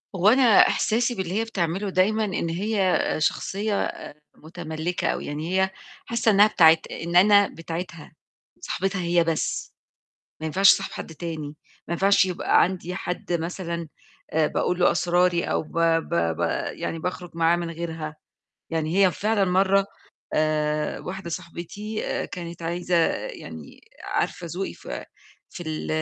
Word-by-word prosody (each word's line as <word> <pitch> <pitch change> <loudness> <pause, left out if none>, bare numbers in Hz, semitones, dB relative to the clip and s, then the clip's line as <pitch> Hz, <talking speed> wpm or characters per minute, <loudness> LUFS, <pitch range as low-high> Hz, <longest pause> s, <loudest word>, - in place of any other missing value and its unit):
هو 185 +2 +2
أنا 260 +3 +5 0.2
إحساسي 235 +2 +1
باللي 185 -3 -3
هي - - +1
بتعمله 195 -2 -2
دايمًا، 210 +4 +2
إن 185 -4 -2
هي 195 +2 +1 0.2
شخصية 200 +6 0
آآ - - -6 0.3
مُتملكّة، 165 +1 -4
أو - - -1
يعني 150 +3 -5
هي 190 0 +2 0.4
حاسة 235 -1 +2
إنها 205 0 +7
بتاعة 165 -6 +6
إن 170 +1 -4
أنا 200 +2 +6
بتاعتها 165 0 -7 0.5
صاحبتها 195 +1 -2
هي 170 0 +2
بس، 165 -2 -2 0.7
ما 160 - -5
ينفعش 190 +5 +5
أصاحب 195 - -4
حد 160 - -8
تاني، 155 -3 -5 0.3
ما 170 - -2
ينفعش 195 +2 +4
يبقى 180 -2 +2
عندي 180 0 -3
حد 180 -1 -4
مثلًا 170 0 -3 0.5
آآ 155 -1 +3
باقول 180 +3 -1
له 180 - +5
أسراري، 175 -1 +2
أو - - 0
ب 155 - -16
ب 165 -1 +2
ب 85 -1 0 0.3
يعني 165 - -4
باخرج 180 +1 -4
معاه 165 0 +3
من 175 -1 -3
غيرها، 160 -2 -5 0.5
يعني 165 +2 -1
هي 185 - +3
فعلًا 210 +1 +1
مَرّة 195 +2 +3 0.5
آآ 150 -1 0
واحدة 190 -1 -6
صاحبتي 180 +5 -6 0.3
كانت 170 -2 -7
عايزة 175 +2 -1 0.3
يعني - - -10 0.2
عارفة 170 - -2
ذوقي 185 +4 -4
ف - - -16 0.6
في 175 - -8
ال 155 -1 -4
175 Hz, 145 wpm, -24 LUFS, 165-195 Hz, 0.7 s, إنها